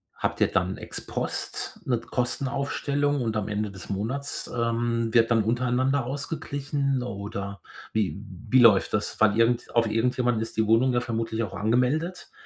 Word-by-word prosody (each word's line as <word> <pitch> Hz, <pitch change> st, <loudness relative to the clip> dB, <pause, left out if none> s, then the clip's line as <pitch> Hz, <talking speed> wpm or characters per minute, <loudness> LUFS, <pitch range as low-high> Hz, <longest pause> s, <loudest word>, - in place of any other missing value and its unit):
Habt -, -, -2 dB
ihr -, -, +6 dB
dann -, -, 0 dB
Ex-Post, 215 Hz, -, -5 dB
'ne 125 Hz, -5 st, +1 dB
Kostenaufstellung 140 Hz, +3 st, -1 dB
und 110 Hz, -2 st, -1 dB
am 105 Hz, -2 st, -1 dB
Ende 105 Hz, 0 st, -2 dB
des 95 Hz, 0 st, -11 dB
Monats, 125 Hz, +9 st, -3 dB
ähm, 115 Hz, -1 st, 0 dB
wird 115 Hz, -1 st, +5 dB
dann 115 Hz, -2 st, +4 dB
untereinander 125 Hz, +3 st, +1 dB
ausgeglichen 140 Hz, -1 st, -2 dB
oder 100 Hz, -2 st, -5 dB, 0.3 s
wie 105 Hz, -1 st, -1 dB, 0.3 s
wie 130 Hz, -, +6 dB
läuft 110 Hz, -5 st, +6 dB
das? 105 Hz, -, -1 dB
Weil 110 Hz, 0 st, +4 dB
irgend 115 Hz, +1 st, +2 dB
auf 115 Hz, -1 st, +4 dB
irgendjemanden 120 Hz, 0 st, +1 dB
ist 115 Hz, -, -5 dB
die 110 Hz, -, +3 dB
Wohnung 120 Hz, +4 st, +4 dB
ja 120 Hz, -, +2 dB
vermutlich 115 Hz, -1 st, -2 dB
auch 100 Hz, -, -5 dB
angemeldet, 130 Hz, -, 0 dB
120 Hz, 155 wpm, -26 LUFS, 110-130 Hz, 0.3 s, ihr